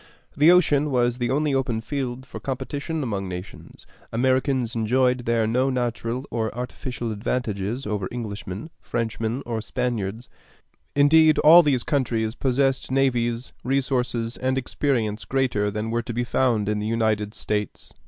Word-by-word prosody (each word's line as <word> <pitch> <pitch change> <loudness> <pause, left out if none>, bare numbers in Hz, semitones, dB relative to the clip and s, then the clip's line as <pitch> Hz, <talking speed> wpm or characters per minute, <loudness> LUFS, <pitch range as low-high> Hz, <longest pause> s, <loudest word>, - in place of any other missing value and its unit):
The 150 +3 +5
ocean 150 -5 +4
was 120 -2 +1
the 120 -1 0
only 145 +2 +1
open 130 -4 0
field 130 +1 -4
for - - -8
competition 145 +4 -3
among 100 -6 -3
nations. 90 +1 -9 0.3
Americans 130 0 +1
enjoyed 125 +2 +1
there 115 -1 +2
no 125 +4 +1
natural 120 0 -2
or 110 -2 -1
artificial 125 -1 -4
advantages 110 +1 -2
over 105 -3 -2
Englishmen, 105 - -6
Frenchmen, 115 +2 -2
or 115 -2 -3
Spaniards; 115 -2 -3 0.7
indeed, 155 +2 +6
all 165 +3 +9
these 140 -6 +1
countries 115 -7 0
possessed 135 +1 0
navies, 125 -3 0
resources, 125 -3 0
and 130 +1 0
experience 115 -5 -1
greater 120 -4 0
than 105 +2 -3
were 120 0 0
to 120 - -6
be 120 +2 0
found 120 -4 +1
in 105 0 0
the 105 - -2
United 110 -2 0
States. 105 -1 -3
120 Hz, 145 wpm, -24 LUFS, 110-135 Hz, 0.7 s, all